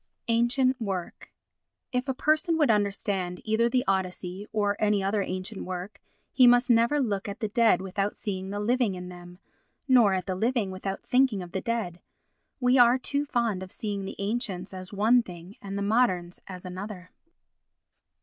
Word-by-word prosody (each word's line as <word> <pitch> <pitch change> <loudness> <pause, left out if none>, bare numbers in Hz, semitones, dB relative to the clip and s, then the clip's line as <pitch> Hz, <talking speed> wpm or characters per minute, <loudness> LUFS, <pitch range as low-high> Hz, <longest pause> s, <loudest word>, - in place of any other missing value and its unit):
Ancient 245 +2 +2
Work 190 -5 -5 0.6
If 250 +1 -1
a 265 - -1
person 310 +4 +2
would 295 -7 +4
understand 200 -3 -1
either 220 +2 +2
the 250 0 +1
Odyssey 190 +1 -2
or 205 -1 +1
any 210 -2 +2
other 200 +2 +1
ancient 185 +2 -4
work, 185 +2 -6 0.3
he 255 -2 +6
must 245 +1 +5
never 235 +5 +3
look 210 -7 -1
at 200 - -7
the 215 - -2
dead 225 -4 +3
without 195 +2 -2
seeing 190 -2 -4
the 205 +1 -3
living 230 -1 +1
in 180 0 -7
them, 175 0 -11 0.5
nor 235 -7 +5
at 185 -1 -3
the 190 - -2
living 220 0 0
without 190 +1 -5
thinking 250 -7 +2
of 175 - -11
the 190 - -3
dead. 225 -7 -3 0.6
We 250 0 +3
are 240 +1 +6
too 280 +2 -2
fond 230 -7 0
of 190 0 -8
seeing 205 -3 -4
the - - -6
ancients 200 -3 -3
as 185 0 -8
one 220 +5 +4
thing 180 -1 -11
and 200 0 -5
the 200 - -2
moderns 200 -5 +1
as 185 -1 -9
another. 185 0 -7
205 Hz, 175 wpm, -27 LUFS, 185-240 Hz, 0.6 s, he